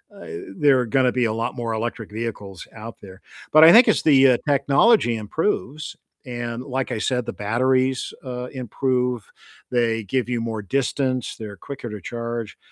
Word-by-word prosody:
uh, -, -, -11 dB, 0.3 s
there 145 Hz, -4 st, +4 dB
are 125 Hz, -, 0 dB
gonna 125 Hz, +2 st, +2 dB
be 125 Hz, -1 st, +1 dB
a 110 Hz, -, 0 dB
lot 115 Hz, +2 st, -3 dB
more 120 Hz, -2 st, -3 dB
electric 115 Hz, -1 st, -4 dB
vehicles 105 Hz, -4 st, -6 dB
out 115 Hz, +1 st, -9 dB
there. 95 Hz, -1 st, -12 dB, 0.3 s
But 155 Hz, +1 st, +7 dB
I 165 Hz, -, +10 dB
think 235 Hz, +2 st, +8 dB
as -, -, +3 dB
the, 135 Hz, -3 st, +6 dB
uh, 120 Hz, -, +3 dB
technology 140 Hz, -, +3 dB
improves, 150 Hz, -, -3 dB, 0.3 s
and 120 Hz, -1 st, -5 dB
like 130 Hz, -1 st, -3 dB
I 110 Hz, -, -3 dB
said, 125 Hz, +1 st, -1 dB
the -, -, -5 dB
batteries, 130 Hz, +4 st, 0 dB
uh, 125 Hz, -2 st, -5 dB
improve, 125 Hz, -2 st, -2 dB, 0.4 s
they 115 Hz, -2 st, +1 dB
give 125 Hz, +5 st, -1 dB
you 120 Hz, -1 st, -1 dB
more 115 Hz, -2 st, -3 dB
distance, 130 Hz, +2 st, -1 dB
they're 105 Hz, -2 st, -8 dB
quicker 130 Hz, +2 st, -8 dB
to 105 Hz, -1 st, -7 dB
charge, 115 Hz, +2 st, -5 dB
125 Hz, 175 wpm, -22 LUFS, 115-130 Hz, 0.4 s, I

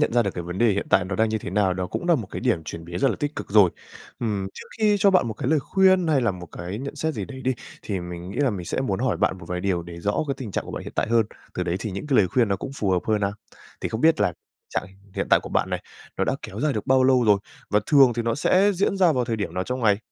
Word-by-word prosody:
nhận 150 Hz, -, +2 dB
ra 120 Hz, -, +4 dB
được 100 Hz, -, -1 dB
cái 90 Hz, -, -4 dB
vấn 90 Hz, +2 st, -6 dB
đề 115 Hz, 0 st, +4 dB
hiện 100 Hz, -, -2 dB
tại 90 Hz, -, +4 dB
nó 95 Hz, 0 st, -4 dB
đang 110 Hz, 0 st, +3 dB
như 110 Hz, 0 st, -1 dB
thế -, -, -6 dB
nào, 95 Hz, -1 st, +2 dB
đó 90 Hz, 0 st, -2 dB
cũng 175 Hz, -, -4 dB
là 170 Hz, -, +6 dB
một 115 Hz, -9 st, -2 dB
cái -, -, -5 dB
điểm 115 Hz, -10 st, +1 dB
chuyển 80 Hz, 0 st, -7 dB
biến 85 Hz, +1 st, -5 dB
rất 135 Hz, -, +3 dB
là -, -, -1 dB
tích 145 Hz, 0 st, -3 dB
cực -, -, -6 dB
rồi. 100 Hz, -4 st, +6 dB, 0.5 s
Ừm, 105 Hz, -4 st, -1 dB
trước -, -, -10 dB
khi 210 Hz, -1 st, +4 dB
cho 200 Hz, 0 st, +5 dB
bạn 180 Hz, -11 st, +3 dB
một 110 Hz, -, -4 dB
cái 130 Hz, +3 st, -3 dB
lời 155 Hz, -2 st, +3 dB
khuyên 190 Hz, +1 st, +3 dB
hay 150 Hz, -4 st, +3 dB
là 120 Hz, -, +2 dB
một 90 Hz, -2 st, -8 dB
cái 90 Hz, +6 st, -6 dB
nhận 140 Hz, +3 st, -6 dB
xét 160 Hz, +2 st, -1 dB
gì -, -, -3 dB
đấy 130 Hz, -1 st, -9 dB
đi, 130 Hz, 0 st, +1 dB, 0.3 s
thì 100 Hz, -3 st, -3 dB
mình 90 Hz, +1 st, -7 dB
nghĩ -, -, -8 dB
là 140 Hz, -3 st, +3 dB
mình 95 Hz, -5 st, -5 dB
sẽ -, -, -1 dB
muốn -, -, -1 dB
hỏi -, -, +1 dB
bạn 95 Hz, -, +1 dB
một 85 Hz, -, -11 dB
vài 90 Hz, 0 st, -2 dB
điều 90 Hz, -3 st, 0 dB
để 85 Hz, 0 st, -9 dB
rõ 105 Hz, -, 0 dB
cái 135 Hz, -, 0 dB
tình 120 Hz, -6 st, -6 dB
trạng -, -, -2 dB
của -, -, -8 dB
bạn -, -, -5 dB
hiện -, -, -8 dB
tại -, -, 0 dB
hơn, 115 Hz, -2 st, +3 dB, 0.3 s
từ 90 Hz, -, -1 dB
đấy 90 Hz, 0 st, -1 dB
thì 110 Hz, -1 st, -4 dB
những 100 Hz, +9 st, -5 dB
cái 135 Hz, -4 st, +2 dB
lời 95 Hz, -, +4 dB
khuyên 115 Hz, +3 st, +2 dB
nó 100 Hz, -, +1 dB
cũng 135 Hz, -, -6 dB
phù 100 Hz, -6 st, -1 dB
hợp 90 Hz, -, +2 dB
hơn 110 Hz, -1 st, +1 dB
a. 100 Hz, -, +1 dB, 0.5 s
Thì -, -, -2 dB
không 110 Hz, -, -4 dB
biết 160 Hz, +3 st, +4 dB
là -, -, +2 dB, 0.4 s
trạng -, -, -2 dB, 0.3 s
hiện -, -, -1 dB
tại -, -, +6 dB
của -, -, -7 dB
bạn -, -, 0 dB
này, -, -, -2 dB, 0.3 s
nó -, -, +1 dB
đã -, -, 0 dB
kéo 100 Hz, -, -7 dB
dài 150 Hz, -1 st, +1 dB
được 105 Hz, -, -4 dB
bao 130 Hz, 0 st, +4 dB
lâu 130 Hz, -2 st, +4 dB
rồi, 105 Hz, -2 st, +5 dB, 0.3 s
và 105 Hz, -, +3 dB
thường 135 Hz, -5 st, +6 dB
thì 120 Hz, -, -1 dB
nó 115 Hz, 0 st, 0 dB
sẽ 190 Hz, +7 st, +3 dB
diễn 195 Hz, +1 st, +1 dB
ra 180 Hz, -4 st, +4 dB
vào 125 Hz, -3 st, +1 dB
thời 115 Hz, -2 st, -2 dB
điểm 105 Hz, -, -4 dB
nào 90 Hz, -, -1 dB
trong 125 Hz, +4 st, -3 dB
ngày? 105 Hz, -3 st, +3 dB
110 Hz, 330 wpm, -24 LUFS, 95-135 Hz, 0.5 s, là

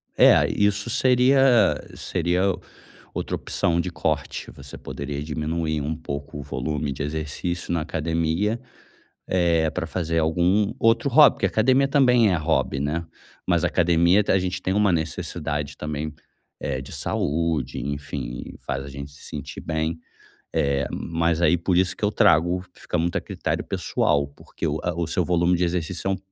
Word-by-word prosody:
É, -, -, +6 dB
isso 105 Hz, +2 st, +1 dB
seria 130 Hz, +2 st, +4 dB, 0.5 s
seria 90 Hz, +2 st, 0 dB, 0.6 s
outra -, -, -2 dB
opção 85 Hz, 0 st, 0 dB
de 90 Hz, -, -4 dB
corte, 75 Hz, -4 st, -2 dB
você 70 Hz, 0 st, -11 dB
poderia 70 Hz, 0 st, -5 dB
diminuir 80 Hz, 0 st, -2 dB
um 75 Hz, +3 st, -2 dB
pouco 70 Hz, -2 st, -6 dB
o -, -, -6 dB
volume 70 Hz, +2 st, -3 dB
de 70 Hz, -, -5 dB
exercício 80 Hz, +4 st, -3 dB
na 85 Hz, -, 0 dB
academia, 85 Hz, +7 st, -1 dB, 0.7 s
eh, 85 Hz, -3 st, +2 dB
pra -, -, -3 dB
fazer 85 Hz, -2 st, -1 dB
algum 90 Hz, +6 st, +2 dB
outro 115 Hz, +4 st, +3 dB
hobby, 150 Hz, +3 st, +7 dB
porque -, -, +1 dB
academia 130 Hz, +5 st, +3 dB
também 125 Hz, -7 st, +4 dB
é 90 Hz, -, +2 dB
hobby, 75 Hz, -4 st, 0 dB
né, 75 Hz, +4 st, -1 dB, 0.4 s
mas -, -, +2 dB
academia, 85 Hz, +3 st, +4 dB
te -, -, +1 dB
a 95 Hz, -, +4 dB
gente 90 Hz, 0 st, -3 dB
tem 95 Hz, -, 0 dB
uma 105 Hz, -2 st, +3 dB
necessidade 75 Hz, -2 st, -3 dB
também, 75 Hz, 0 st, -4 dB, 0.5 s
é 65 Hz, -2 st, -2 dB
de 65 Hz, -, -11 dB
saúde, 75 Hz, -4 st, -1 dB
enfim, 70 Hz, -3 st, -4 dB, 0.2 s
faz 70 Hz, -, -2 dB
a -, -, -8 dB
gente 70 Hz, +1 st, -8 dB
se 70 Hz, -, -15 dB
sentir 75 Hz, -1 st, -7 dB
bem. 80 Hz, +1 st, -2 dB, 0.6 s
É, 70 Hz, -1 st, +1 dB
mas 85 Hz, 0 st, -1 dB
aí, 85 Hz, +1 st, +4 dB
por 85 Hz, +2 st, 0 dB
isso 95 Hz, 0 st, +2 dB
que -, -, -11 dB
eu 105 Hz, -, +3 dB
trago 90 Hz, +2 st, +3 dB
fica -, -, -4 dB
muito 85 Hz, +3 st, 0 dB
a -, -, -2 dB
critério -, -, -3 dB
pessoal, 70 Hz, -1 st, 0 dB
porque -, -, -7 dB
o 75 Hz, +2 st, -1 dB
a 90 Hz, -, -1 dB
o 85 Hz, 0 st, -1 dB
seu 90 Hz, +2 st, 0 dB
volume 90 Hz, 0 st, +2 dB
de 90 Hz, -, +1 dB
exercício 90 Hz, +2 st, -2 dB
é -, -, +2 dB
um -, -, -3 dB
85 Hz, 165 wpm, -24 LUFS, 75-90 Hz, 0.7 s, hobby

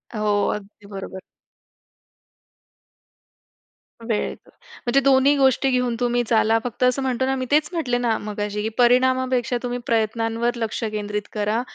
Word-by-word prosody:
हो. 210 Hz, -1 st, +1 dB
अगदी 205 Hz, 0 st, -12 dB
बरोबर. 195 Hz, -1 st, -7 dB, 2.9 s
वेळेत. 215 Hz, -2 st, -1 dB, 0.5 s
म्हणजे 245 Hz, +3 st, +3 dB
दोन्ही 275 Hz, +1 st, +4 dB
गोष्टी 270 Hz, 0 st, +3 dB
घेऊन 250 Hz, -2 st, 0 dB
तुम्ही 245 Hz, 0 st, +1 dB
चाला. 225 Hz, 0 st, +3 dB
फक्त 245 Hz, 0 st, -4 dB
असं 250 Hz, +2 st, +2 dB
म्हणतो 260 Hz, -1 st, 0 dB
ना, 265 Hz, 0 st, 0 dB
मी 260 Hz, -1 st, -3 dB
तेच 300 Hz, +1 st, +3 dB
म्हटले 255 Hz, -8 st, 0 dB
ना 235 Hz, -3 st, 0 dB
मगाशी, 210 Hz, 0 st, -4 dB
की 220 Hz, -, -1 dB
परिणामापेक्षा 255 Hz, 0 st, +2 dB
तुम्ही 245 Hz, 0 st, -3 dB
प्रयत्नांवर 225 Hz, +1 st, 0 dB
लक्ष 225 Hz, 0 st, -3 dB
केंद्रित 210 Hz, -1 st, -3 dB
करा, 210 Hz, +2 st, 0 dB
240 Hz, 135 wpm, -22 LUFS, 215-255 Hz, 2.9 s, दोन्ही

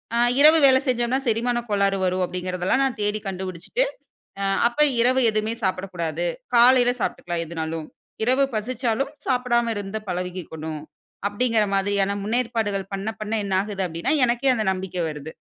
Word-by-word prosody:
அ -, -, +2 dB, 0.2 s
இரவு 310 Hz, +2 st, +7 dB
வேல 260 Hz, -1 st, +6 dB
செஞ்சம்னா 245 Hz, +1 st, +1 dB
செரிமானக் 240 Hz, +1 st, 0 dB
கோளாறு 200 Hz, -1 st, +2 dB
வரும் 185 Hz, 0 st, 0 dB
அப்டிங்கிறதுலாம் 180 Hz, +7 st, -1 dB
நான் 245 Hz, -4 st, -2 dB
தேடி 205 Hz, +1 st, 0 dB
கண்டுபிடிச்சுட்டு, 190 Hz, -, -2 dB, 0.6 s
அ -, -, -1 dB, 0.3 s
அப்ப 240 Hz, -, -12 dB, 0.2 s
இரவு 255 Hz, +2 st, +3 dB
எதுமே 215 Hz, +1 st, -1 dB
சாப்புடக் 190 Hz, 0 st, -2 dB
கூடாது. 170 Hz, 0 st, -2 dB, 0.3 s
காலையில 245 Hz, +1 st, +6 dB
சாப்ட்டுக்கலாம் 175 Hz, -3 st, -2 dB
எதனாலும். 160 Hz, -1 st, -4 dB, 0.4 s
இரவு 260 Hz, +3 st, +3 dB
பசிச்சாலும் 245 Hz, +4 st, -1 dB, 0.2 s
சாப்படாம 240 Hz, -2 st, +1 dB
இருந்த 200 Hz, +1 st, -4 dB
பழகிக்கணும். 175 Hz, -4 st, -5 dB, 0.5 s
அப்டிங்கிற 225 Hz, 0 st, +1 dB
மாதிரியான 200 Hz, 0 st, +1 dB
முன்னேற்பாடுகள் 220 Hz, -4 st, -1 dB
பண்ண, 200 Hz, +3 st, -3 dB
பண்ண 215 Hz, +1 st, -3 dB
என்னாகுது 195 Hz, 0 st, -1 dB
அப்டின்னா 170 Hz, -, -1 dB
எனக்கே 245 Hz, +2 st, +2 dB
அந்த 215 Hz, -2 st, -1 dB
நம்பிக்க 185 Hz, -1 st, -5 dB
வருது. 150 Hz, +1 st, -8 dB
205 Hz, 140 wpm, -23 LUFS, 185-240 Hz, 0.6 s, இரவு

